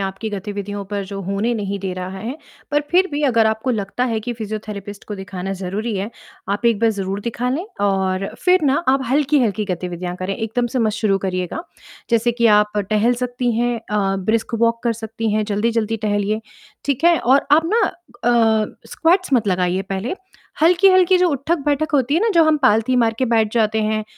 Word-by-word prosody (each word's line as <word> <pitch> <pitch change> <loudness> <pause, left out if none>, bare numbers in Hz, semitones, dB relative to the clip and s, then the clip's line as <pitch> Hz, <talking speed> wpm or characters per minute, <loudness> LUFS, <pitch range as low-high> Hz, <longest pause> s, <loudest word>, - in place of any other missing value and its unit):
आपकी 195 +3 -3
गतिविधियों 205 0 -5
पर 200 0 -4
जो 195 +1 -6
होने 200 +5 -1
नहीं 200 -2 -3
दे 190 -1 -3
रहा 185 +1 -6
है। 235 +7 -5 0.3
पर 295 0 +2
फ़िर 370 +2 +4
भी 290 +1 -1
अगर 230 -5 +3
आपको 220 +4 0
लगता 215 +1 -1
है 230 -3 -1
कि 240 +3 -4
फिज़ियोथेरेपिस्ट 210 -2 -6
को 210 - -4
दिखाना 190 -1 -5
ज़रूरी 205 +4 -3
है, 195 +3 -3 0.4
आप 205 +4 0
एक 230 -3 +3
बार 230 -1 +4
ज़रूर 195 -1 -3
दिखा 235 +3 -3
लें 300 +8 -2 0.2
और 190 -1 0 0.2
फ़िर 365 -1 +4
ना 275 0 +3
आप 265 +1 +3
हल्की-हल्की 265 -7 +2
गतिविधियाँ 180 0 -4
करें, 185 +2 -3
एकदम 225 +2 -1
से 245 +2 -3
मत 220 -3 +1
शुरू 205 -2 +1
करिएगा। 185 - -3 0.5
जैसे 235 +1 +2
कि 235 0 +2
आप 210 0 0
टहल 215 +3 +3
सकती 245 -1 -1
हैं 240 0 +1 0.2
अ, 195 -2 +1
ब्रिस्क 220 +4 -1
वॉक 230 0 +2
कर 235 - +2
सकती 225 0 -4
हैं, 215 0 +1
जल्दी-जल्दी 225 +1 0
टहलिए, 205 +1 0 0.4
ठीक 280 +2 -1
है? 340 -1 +5
और 265 +3 +3
आप 315 +2 +6
ना 460 - +4
अ, 235 -10 +1 0.3
स्क्वैट्स 355 0 +1
मत 235 -5 +3
लगाइए 180 0 +1
पहले। 195 - -3 0.5
हल्की-हल्की 370 +2 +5
जो 360 0 +3
उठक-बैठक 295 +1 -1
होती 270 0 +2
है 335 - +3
ना, 460 - +2
जो 335 - +6
हम 315 -1 +4
पालथी 250 +1 +3
मार 230 -2 +3
के 260 - +2
बैठ 220 -2 +2
जाते 220 -1 +2
हैं, 215 0 0
220 Hz, 195 wpm, -20 LUFS, 200-255 Hz, 0.5 s, आप